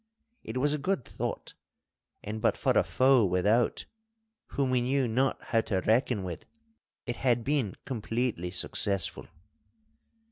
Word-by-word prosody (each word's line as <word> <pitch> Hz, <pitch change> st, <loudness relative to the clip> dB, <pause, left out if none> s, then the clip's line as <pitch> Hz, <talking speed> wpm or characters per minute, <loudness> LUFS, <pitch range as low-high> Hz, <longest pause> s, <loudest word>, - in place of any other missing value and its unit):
It 110 Hz, +3 st, -5 dB
was 145 Hz, +3 st, +2 dB
a 150 Hz, -, -1 dB
good 185 Hz, -4 st, -1 dB
thought, -, -, -5 dB, 0.7 s
and 110 Hz, +1 st, -5 dB
but -, -, +2 dB
for -, -, +1 dB
a -, -, +4 dB
foe 130 Hz, -2 st, +4 dB
without, 105 Hz, +5 st, +1 dB, 0.6 s
whom 135 Hz, -2 st, -1 dB
we 125 Hz, -1 st, +2 dB
knew 130 Hz, +1 st, +1 dB
not 130 Hz, +4 st, +1 dB
how 115 Hz, -, +1 dB
to 95 Hz, -4 st, -1 dB
reckon 110 Hz, -1 st, +1 dB
with, 90 Hz, -3 st, -7 dB, 0.6 s
it 120 Hz, -, -4 dB
had 120 Hz, -3 st, +1 dB
been 135 Hz, -7 st, 0 dB
completely 115 Hz, -6 st, -2 dB
successful. 95 Hz, +1 st, 0 dB
120 Hz, 140 wpm, -29 LUFS, 105-130 Hz, 0.7 s, a